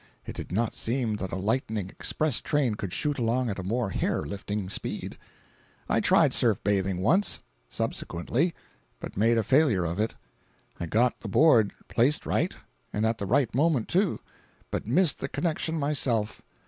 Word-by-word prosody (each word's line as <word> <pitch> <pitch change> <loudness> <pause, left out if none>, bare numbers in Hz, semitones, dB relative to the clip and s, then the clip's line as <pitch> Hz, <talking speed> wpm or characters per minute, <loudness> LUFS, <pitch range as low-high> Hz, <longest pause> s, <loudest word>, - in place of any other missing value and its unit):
It - - -7
did - - -7
not 115 +5 0
seem 115 -3 -1
that 95 -2 -5
a - - -2
lightning 105 -1 -1
express 155 -6 0
train 145 -7 +1
could 100 -3 -5
shoot 145 +6 0
along 120 0 +1
at 100 - -5
a - - -4
more 110 +2 -1
hair - - -1
lifting 100 +4 -4
speed. 95 - -4 0.7
I - - +2
tried - - +4
surf - - +3
bathing 95 -2 0
once, 185 - +2 0.3
subsequently, 130 - -1 0.4
but - - -8
made 115 +4 +3
a 115 - +2
failure 125 - +3
of 85 +4 -3
it. 110 +1 -1 0.6
I 85 - -3
got 115 +8 +2
the 110 - -7
board 115 -4 +5 0.2
placed 130 +6 +2
right, - - 0 0.4
and 105 +1 0
at 110 0 0
the 100 - -3
right 125 +1 +2
moment, 140 -2 +2
too; 190 +1 +1 0.5
but - - -3
missed 165 +6 +3
the 135 - -4
connection 160 0 -1
myself. 130 -7 0
115 Hz, 170 wpm, -27 LUFS, 100-140 Hz, 0.7 s, board